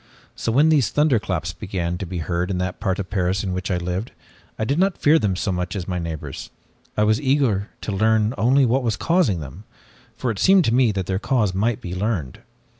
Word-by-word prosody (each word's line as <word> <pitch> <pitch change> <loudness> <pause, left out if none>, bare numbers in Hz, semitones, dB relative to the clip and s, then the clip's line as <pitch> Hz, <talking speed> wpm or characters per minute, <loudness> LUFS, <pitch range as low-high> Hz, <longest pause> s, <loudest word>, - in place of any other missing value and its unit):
So 115 - -2
when 145 +7 +4
these 145 -8 +3
thunderclaps 105 - 0
began 90 -2 -3
to 95 - -4
be 90 +1 -5
heard 85 +2 -2
in 95 - -1
the 90 0 -1
part 95 -3 -2
of 100 -2 -5
Paris 95 -1 0
in 95 -2 -2
which 95 +1 -3
I 90 - +1
lived, 90 +5 -3 0.5
I 110 - -1
did 140 +7 0
not 190 0 +2
fear 155 +2 +4
them 100 -7 0
so 95 +2 -1
much 90 +3 -3
as 90 -3 -4
my 90 -2 -2
neighbors. 80 -4 -6 0.5
I 105 - +3
was 110 +3 +2
eager 130 -8 +1
to - - -4
learn 110 +2 +2
only 130 +4 +3
what 125 +3 +2
was 115 -3 -1
causing 165 - +1
them, 75 +8 -9 0.5
for 125 - -1
it 105 - -6
seemed 190 -3 +5
to 115 - +1
me 125 -2 +4
that 95 -2 -3
their 95 +1 -1
cause 105 -5 +1
might 105 +4 0
be 90 - -6
learned. 95 - -2
100 Hz, 225 wpm, -22 LUFS, 90-120 Hz, 0.5 s, seemed